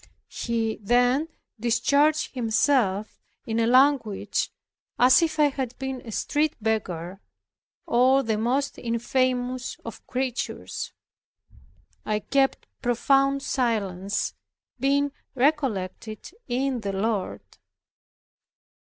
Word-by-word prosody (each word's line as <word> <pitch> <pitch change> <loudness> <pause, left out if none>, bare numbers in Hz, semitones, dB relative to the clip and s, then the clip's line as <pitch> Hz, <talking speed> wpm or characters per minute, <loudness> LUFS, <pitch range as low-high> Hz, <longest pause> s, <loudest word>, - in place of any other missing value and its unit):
He 225 -2 -1
then 245 +7 +3 0.3
discharged 280 +7 +2
himself 225 -4 +1 0.2
in 225 0 -2
language 255 -6 +3 0.5
as 255 +6 +6
if 320 -1 0
I 295 -1 +5
had 260 -3 -4
been 265 -1 -4
a 225 - -9
street 300 +7 0
beggar, 195 -4 -2 0.6
or 260 +3 +4
the 220 -3 0
most 260 +5 0
infamous 250 +1 -1
of - - -9
creatures. 255 -1 -3 1.1
I 215 - 0
kept 270 +5 +1 0.2
profound 275 +3 +2
silence, 200 -6 -1 0.5
being 280 +2 +2 0.2
recollected 230 - -1 0.2
in 260 0 0
the 200 -2 -3
Lord. 200 0 -1
245 Hz, 90 wpm, -25 LUFS, 220-275 Hz, 1.1 s, as